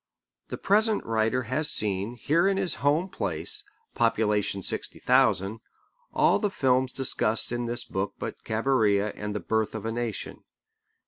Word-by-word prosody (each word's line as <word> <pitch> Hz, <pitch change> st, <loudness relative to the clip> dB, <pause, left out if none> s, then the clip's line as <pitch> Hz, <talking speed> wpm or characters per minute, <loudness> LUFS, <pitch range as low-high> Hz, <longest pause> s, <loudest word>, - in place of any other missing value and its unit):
The -, -, -6 dB
present 215 Hz, +2 st, +1 dB
writer 115 Hz, +3 st, 0 dB
has 150 Hz, +7 st, -1 dB
seen, 105 Hz, +2 st, -1 dB
here 165 Hz, -, +1 dB
in 195 Hz, -1 st, +1 dB
his 190 Hz, -2 st, 0 dB
home 150 Hz, +6 st, +2 dB
place, 90 Hz, -, 0 dB, 0.3 s
population 105 Hz, -4 st, +1 dB
sixty -, -, -2 dB
thousand, 100 Hz, +4 st, +2 dB, 0.5 s
all -, -, +3 dB
the 205 Hz, -, 0 dB
films 130 Hz, -6 st, +1 dB
discussed 120 Hz, -5 st, +1 dB
in 120 Hz, 0 st, -2 dB
this 120 Hz, +1 st, 0 dB
book 95 Hz, +1 st, -3 dB
but -, -, -7 dB
Cabiria 110 Hz, -3 st, +1 dB
and 105 Hz, 0 st, -5 dB
The -, -, -1 dB
Birth 110 Hz, 0 st, -1 dB
of 110 Hz, -, -6 dB
a 115 Hz, -, -1 dB
Nation. 115 Hz, -2 st, -4 dB
115 Hz, 150 wpm, -26 LUFS, 105-135 Hz, 0.5 s, all